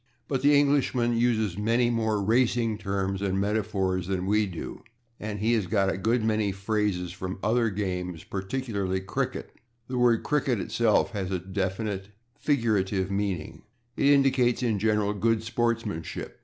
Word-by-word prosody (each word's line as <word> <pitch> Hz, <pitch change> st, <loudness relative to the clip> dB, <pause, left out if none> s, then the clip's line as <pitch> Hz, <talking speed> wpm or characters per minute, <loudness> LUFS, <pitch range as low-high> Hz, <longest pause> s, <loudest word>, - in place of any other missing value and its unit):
But 135 Hz, -3 st, -1 dB
the 145 Hz, +1 st, +5 dB
Englishman 135 Hz, -4 st, +2 dB
uses 110 Hz, -5 st, +1 dB
many 115 Hz, +3 st, +2 dB
more 110 Hz, -3 st, 0 dB
racing 115 Hz, 0 st, +2 dB
terms 95 Hz, -1 st, -2 dB
and 95 Hz, -1 st, 0 dB
metaphors 100 Hz, -3 st, 0 dB
than 95 Hz, -1 st, -1 dB
we 105 Hz, +1 st, +2 dB
do, 85 Hz, -4 st, -7 dB, 0.4 s
and 105 Hz, -1 st, -4 dB
he 110 Hz, +3 st, +1 dB
has 105 Hz, -6 st, +1 dB
got 95 Hz, 0 st, +2 dB
a -, -, -4 dB
good 115 Hz, +3 st, +1 dB
many 110 Hz, -2 st, +1 dB
phrases 95 Hz, -2 st, -1 dB
from 95 Hz, +1 st, -5 dB
other 115 Hz, +1 st, +2 dB
games, 90 Hz, -4 st, -3 dB
particularly 100 Hz, -2 st, -2 dB
cricket. 95 Hz, -, -3 dB, 0.4 s
The 125 Hz, -1 st, -2 dB
word 120 Hz, -2 st, +3 dB
/cricket/ 135 Hz, -6 st, +1 dB
itself 115 Hz, +2 st, +2 dB
has 100 Hz, -4 st, -3 dB
a 95 Hz, -, 0 dB
definite 95 Hz, +2 st, -3 dB, 0.3 s
figurative 105 Hz, -9 st, 0 dB
meaning. 100 Hz, -5 st, -2 dB, 0.3 s
It 140 Hz, -, +2 dB
indicates, 135 Hz, -4 st, +3 dB
in 110 Hz, -4 st, +1 dB
general, 105 Hz, -1 st, +1 dB
good 110 Hz, +2 st, +1 dB
sportsmanship. 115 Hz, -6 st, -2 dB
105 Hz, 150 wpm, -27 LUFS, 95-115 Hz, 0.4 s, the